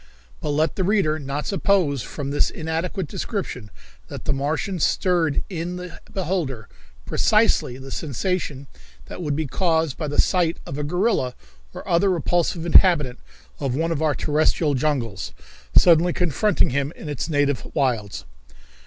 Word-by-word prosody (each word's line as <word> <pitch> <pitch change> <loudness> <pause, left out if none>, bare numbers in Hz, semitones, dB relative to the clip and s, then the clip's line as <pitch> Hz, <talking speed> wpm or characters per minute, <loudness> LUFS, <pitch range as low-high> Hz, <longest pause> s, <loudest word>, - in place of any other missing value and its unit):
But 150 - -4
let 155 +2 +1
the 190 - +1
reader 185 -6 +2
not 140 +1 -4
suppose 185 - +1
from 140 +4 -5
this 145 - +2
inadequate 165 +3 -3
description 140 - -4 0.4
that - - -8
the - - +1
Martians 155 +6 -1
stirred 170 -5 +1
in 175 -1 -4
the 180 -1 -8
beholder 165 - -2 0.4
precisely 130 - +2
the 135 0 -10
sensation 150 -1 -2 0.4
that - - -8
would 150 -4 -1
be 155 +1 -1
caused 160 -1 0
by 155 - -2
the 145 - -2
sight 175 -3 +2
of 135 - -5
a - - -1
gorilla, 175 - 0 0.4
or - - -8
other 175 +4 +3
repulsive 175 -1 0
inhabitant 160 -7 +5 0.4
of 135 -3 -1
one 165 +3 0
of 160 -2 -1
our 155 -2 +2
terrestrial 150 0 +1
jungles, 125 - -1 0.4
suddenly 170 0 +6
confronting 180 +1 +1
him 140 +2 -1
in - - -9
its 145 +2 -3
native 145 -4 +1
wilds. 105 - -1
155 Hz, 150 wpm, -23 LUFS, 140-175 Hz, 0.4 s, suddenly